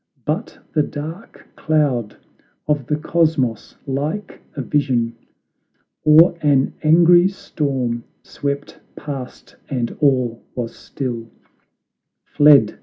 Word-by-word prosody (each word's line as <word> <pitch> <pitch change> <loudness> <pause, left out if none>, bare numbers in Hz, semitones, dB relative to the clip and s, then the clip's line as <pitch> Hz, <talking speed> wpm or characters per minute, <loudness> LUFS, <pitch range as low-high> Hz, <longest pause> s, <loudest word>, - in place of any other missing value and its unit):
But - - -3 0.2
the 155 - +3
dark 155 +8 -7
cloud 140 -9 0 0.5
of 145 -4 0
the 150 - +1
Cosmos 155 -6 0
like 150 +9 -4
a 140 - -3
vision 125 -5 0 0.9
Or 160 +3 +6
an 140 -3 +2
angry 175 +3 +6
storm, 135 -10 -3 0.2
swept 140 0 -5 0.2
past 135 -4 -8
and 125 -4 -2
all 130 -5 +2
was 120 -2 -4
still; 120 -4 -5 0.9
Fled 145 -8 +5
145 Hz, 100 wpm, -20 LUFS, 125-155 Hz, 0.9 s, Or